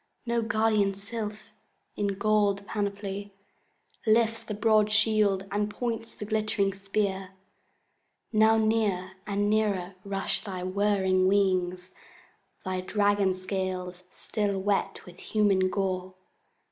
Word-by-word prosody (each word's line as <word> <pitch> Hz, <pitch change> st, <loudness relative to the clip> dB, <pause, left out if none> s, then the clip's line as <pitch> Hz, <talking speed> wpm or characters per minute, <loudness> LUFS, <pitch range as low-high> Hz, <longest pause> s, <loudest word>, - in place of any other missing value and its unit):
No 235 Hz, 0 st, +1 dB
guardian 215 Hz, -3 st, +2 dB
sylph, 210 Hz, +1 st, -6 dB, 0.4 s
in 200 Hz, -1 st, -1 dB
golden 205 Hz, -1 st, +2 dB
panoply, 200 Hz, -1 st, -4 dB, 0.7 s
Lifts 225 Hz, +1 st, +3 dB
the 210 Hz, -, -5 dB
broad 215 Hz, -1 st, +3 dB
shield, 210 Hz, -3 st, +3 dB
and 205 Hz, +1 st, 0 dB
points 230 Hz, 0 st, -3 dB
the 210 Hz, -, -8 dB
glittering 215 Hz, -2 st, 0 dB
spear. 195 Hz, -1 st, -2 dB, 1.0 s
Now 220 Hz, +1 st, +5 dB
near 215 Hz, -4 st, +1 dB, 0.2 s
and 205 Hz, 0 st, 0 dB
nearer 205 Hz, -4 st, +1 dB
rush 195 Hz, -1 st, -1 dB
thy 185 Hz, -4 st, -5 dB
whirring 190 Hz, -1 st, +2 dB
wings, 185 Hz, -2 st, +1 dB, 0.7 s
Thy 185 Hz, 0 st, -2 dB
dragon 205 Hz, -1 st, +2 dB
scales 185 Hz, -1 st, -4 dB
still 205 Hz, -2 st, -2 dB
wet 195 Hz, 0 st, -1 dB
with 180 Hz, -1 st, -13 dB
human 200 Hz, -3 st, +2 dB
gore. 185 Hz, -1 st, -2 dB
200 Hz, 110 wpm, -28 LUFS, 190-215 Hz, 1.0 s, Now